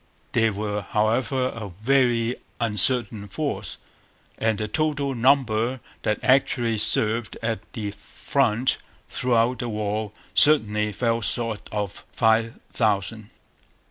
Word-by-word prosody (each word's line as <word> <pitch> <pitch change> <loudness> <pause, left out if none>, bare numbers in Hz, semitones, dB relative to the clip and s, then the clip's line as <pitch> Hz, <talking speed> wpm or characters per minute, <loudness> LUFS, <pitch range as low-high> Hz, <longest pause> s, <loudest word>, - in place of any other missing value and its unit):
They 115 -1 +3
were, 105 0 -3
however, 120 +6 0
a 110 -5 -7
very 120 +3 +1 0.2
uncertain 110 -1 +2
force; 95 - -3 0.6
and 110 -1 +1
the 105 - -2
total 145 +2 0
number 125 -1 +2 0.2
that 105 - 0
actually 125 -4 +2
served 110 +1 +1
at 115 -2 -1
the 105 -3 -4
front 125 +3 0 0.3
throughout 125 0 +1
the 120 - -3
war 105 -1 -2 0.2
certainly 105 -8 +4
fell 115 +2 0
short 115 -1 -2
of 105 -2 -4
five 115 0 +2
thousand. 105 -1 0
115 Hz, 110 wpm, -24 LUFS, 105-125 Hz, 0.6 s, certainly